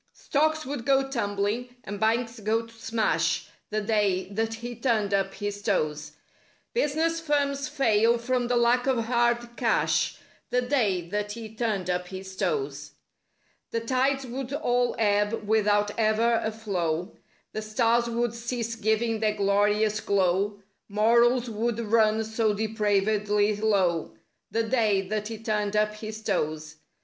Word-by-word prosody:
Stocks 310 +2 0
would 270 -2 -4
go 270 +1 +3
tumbling 230 0 -2
and 205 +1 -6
banks 230 +1 0
go 220 +2 0
to 230 - -17
smash— 225 -1 0 0.2
The 215 0 -1
day 205 -3 +1
that 225 +2 -1
he 240 +1 -7
turned 225 -4 0
up 195 0 0
his 205 0 -4
toes; 155 -7 -1 0.6
Business 330 - +1
firms 285 -2 0
fail 235 -5 +3
from 245 +1 -1
the 245 - +1
lack 240 +2 +3
of 245 -4 +1
hard 240 0 +1
cash— - - +1 0.3
The 250 +1 +1
day 210 -10 +1
that 205 +1 -2
he 220 -1 -8
turned 215 -5 -1
up 180 0 -1
his 190 0 -8
toes. 410 - -2 0.8
The 230 - -1
tides 265 +3 0
would 255 +1 -5
all 245 -4 +1
ebb 210 0 +1
without 205 -1 +2
ever 225 +1 +3
a 220 - -1
flow; 180 -5 -2 0.4
The 215 - -3
stars 230 +2 +1
would 235 0 -1
cease 235 0 -3
giving 220 +1 0
their 215 -1 +1
glorious 205 +1 +2
glow; 200 +1 0 0.3
Morals 235 +4 +3
would 230 +1 -2
run 220 -1 +3
so 220 -1 0
depravedly 210 -1 +1
low— 190 -6 +1 0.3
The 225 +3 0
day 220 -4 +2
that 210 0 -2
he 225 0 -5
turned 210 -2 -1
up 210 0 +2
his 215 0 -7
toes. 155 -2 -2
220 Hz, 145 wpm, -27 LUFS, 205-240 Hz, 0.8 s, go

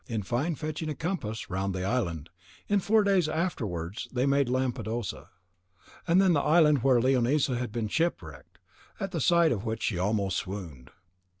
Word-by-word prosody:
In 110 -4 -3
fine, 140 - -1
fetching 155 +1 -4
a 150 - -3
compass 130 - -4
round 95 0 -2
the 90 - -3
island, 90 - -2 0.4
in 205 0 +2
four 215 +3 +3
days 190 -5 +2
afterwards 105 - -3
they 125 +1 0
made 140 -2 +2
Lampadosa, 120 -4 -2 0.8
and 170 +2 +4
then 190 -2 +4
the 145 - +3
island 150 -4 +4
where 130 -1 +4
Leonisa 130 +2 +2
had 120 -2 -3
been 115 -1 -2
shipwrecked, 85 - -3 0.4
at 195 -1 -4
sight 170 +1 +4
of 105 -3 -2
which 115 -1 -3
she 90 -6 -1
almost 100 0 0
swooned. 85 -10 -6
125 Hz, 165 wpm, -28 LUFS, 100-155 Hz, 0.8 s, and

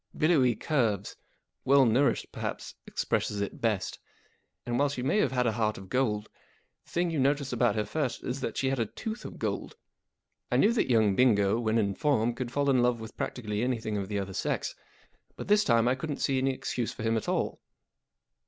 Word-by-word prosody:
Billowy 145 -7 +3
curves. 110 - 0 0.5
Well 135 0 +5
nourished 125 +5 +2
perhaps - - -5
expresses 105 - -1
it 100 - -4
best. 105 -5 -1 0.7
And, 120 0 -1
while 145 0 +3
she 130 -3 -4
may 170 +11 +2
have 135 - +2
had 125 -1 +1
a 115 - +3
heart 110 -1 0
of 95 -1 -11
gold, 110 -5 0 0.6
the - - -22
thing 175 0 0
you 160 - -1
noticed 140 0 +1
about 120 -1 +2
her 105 -1 0
first 150 -6 -2
was 130 +2 -3
that - - -3
she 135 - +1
had 135 - -1
a 115 - 0
tooth 220 - -6
of - - -8
gold. - - -3 0.8
I - - +3
knew 220 - +4
that 230 - +1
young 110 -5 +4
Bingo, 105 -3 +3
when 115 -1 +1
in 100 -3 +1
form, 120 -3 +1
could 120 0 -5
fall 145 +1 0
in 130 -2 +4
love 120 -1 +2
with 110 0 -9
practically 105 -4 -3
any¬ 125 -1 0
thing 110 -1 -3
of 100 -2 -2
the 105 0 -2
other 95 -1 -3
sex; - - -2 0.6
but - - -7
this 210 +1 +5
time 115 - +3
I 125 - +4
couldn't 145 +2 -4
see 135 -1 +1
any 135 +1 +1
excuse 125 -2 -3
for - - -8
him 115 0 +1
at 110 - -2
all. - - -1
120 Hz, 210 wpm, -29 LUFS, 110-135 Hz, 0.8 s, Well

